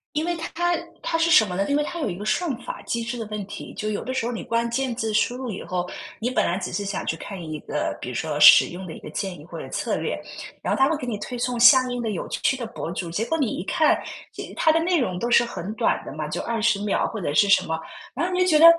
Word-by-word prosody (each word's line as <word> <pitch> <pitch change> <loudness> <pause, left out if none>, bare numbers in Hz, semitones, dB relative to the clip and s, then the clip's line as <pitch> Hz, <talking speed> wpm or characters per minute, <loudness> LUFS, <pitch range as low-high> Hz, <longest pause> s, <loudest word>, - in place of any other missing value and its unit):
因 305 - +1
为 350 - 0
它 330 - -4
它 350 0 +1 0.3
它 - - 0
是 330 +1 +2
什 310 -9 +7
么 180 -3 -4
呢， 195 - 0
因 285 - +2
为 295 - +2
它 340 +3 -5
有 290 - -1
一 175 - -5
个 205 - -6
算 295 +11 0
法 - - -6
机 235 0 -2
制 235 +2 -4
的 225 - -3
问 210 -1 -4
题。 - - -8
就 215 0 -2
有 205 - -3
的 260 - -4
时 260 -3 -1
候 240 - -1
你 230 - -5
关 230 +1 0
键 260 0 -1
字 225 -2 -2
输 215 +3 +2
入 255 -2 -4
以 190 - -6
后， 180 -1 -3 0.3
你 235 - -1
本 255 - +1
来 175 - 0
只 195 - -4
是 200 +3 -2
想 200 -1 -3
去 165 - -1
看 195 +3 -7
一 155 -2 -5
个， 150 - -2
比 - - -5
如 125 - -5
说 150 +1 -2
使 - - +9
用 185 +1 -8
的 160 - -7
一 - - -9
个 - - -9
建 190 -3 -3
议 145 - -12
或 - - -8
者 - - -7
策 - - -1
略， - - -2 0.5
然 - - +1
后 - - -1
它 270 +1 +5
会 325 - +1
给 265 - -6
你 235 -4 -2
推 245 +4 -5
送 245 0 -1
相 255 +1 +7
应 245 - -2
的 225 -2 -2
有 185 - -3
趣 - - +1
的 250 -2 -5
博 225 - -6
主， 175 -1 -4
结 210 +7 -1
果 325 +6 0
你 270 -7 0
一 - - -3
看， 310 +7 +3 0.3
即 - - -8
他 320 - +3
的 320 - +3
内 350 +2 +2
容 185 -8 -1
都 235 - -1
是 240 - +6
很 215 -3 -5
短 - - +1
的 - - -7
嘛， 155 -1 -4
就 155 - -2
20 225 -2 +1
秒 210 - +1
或 220 - -5
者 160 -6 -2
是 200 +6 +4
什 200 - +5
么， 160 - -1 0.4
然 295 +7 -1
后 365 - -2
你 360 - 0
就 365 - +4
觉 325 -4 +4
得 320 - +8
230 Hz, 330 characters per minute, -24 LUFS, 190-265 Hz, 0.5 s, 使